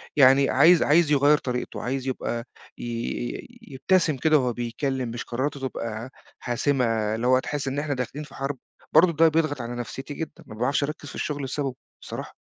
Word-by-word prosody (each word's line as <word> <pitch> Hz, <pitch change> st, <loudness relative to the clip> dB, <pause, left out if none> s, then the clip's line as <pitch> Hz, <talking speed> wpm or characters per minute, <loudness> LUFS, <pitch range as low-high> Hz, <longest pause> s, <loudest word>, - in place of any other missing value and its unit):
يعني 135 Hz, 0 st, +6 dB
عايز 165 Hz, +6 st, +6 dB
عايز 155 Hz, 0 st, +4 dB
يغيّر 145 Hz, +1 st, +5 dB
طريقته، 125 Hz, -2 st, -4 dB
عايز 130 Hz, +1 st, -2 dB
يبقى 120 Hz, -2 st, -2 dB, 0.3 s
ي -, -, -8 dB
ي 120 Hz, +1 st, -4 dB, 0.3 s
يبتسم 160 Hz, +1 st, +2 dB
كده 155 Hz, +3 st, +4 dB
وهو 125 Hz, -2 st, 0 dB
بيكلّم، 125 Hz, +2 st, -2 dB
مش 120 Hz, +1 st, -5 dB
قراراته 135 Hz, +4 st, -3 dB
تبقى 115 Hz, 0 st, -5 dB, 0.3 s
حاسمة 125 Hz, +2 st, 0 dB, 0.3 s
اللي 115 Hz, +2 st, -1 dB
هو 130 Hz, 0 st, +5 dB
تحس 145 Hz, +1 st, -3 dB
إن 135 Hz, +2 st, -1 dB
إحنا 145 Hz, -1 st, -1 dB
داخلين 130 Hz, +4 st, -4 dB
في -, -, -15 dB
حرب، 135 Hz, 0 st, -3 dB, 0.4 s
برضو 170 Hz, +1 st, +6 dB
ده 165 Hz, +1 st, +5 dB
بيضغط 155 Hz, -4 st, +1 dB
على 120 Hz, +1 st, -5 dB
نفسيتي 135 Hz, +4 st, -6 dB
جدًا، 155 Hz, 0 st, -7 dB
ما 110 Hz, -, -9 dB
باعرفش 130 Hz, +5 st, +1 dB
أركّز 145 Hz, 0 st, -5 dB
في -, -, -10 dB
الشغل 145 Hz, -2 st, -3 dB
بسببه، 135 Hz, -1 st, -3 dB, 0.3 s
صراحة. -, -, -7 dB
135 Hz, 185 wpm, -25 LUFS, 125-150 Hz, 0.4 s, يعني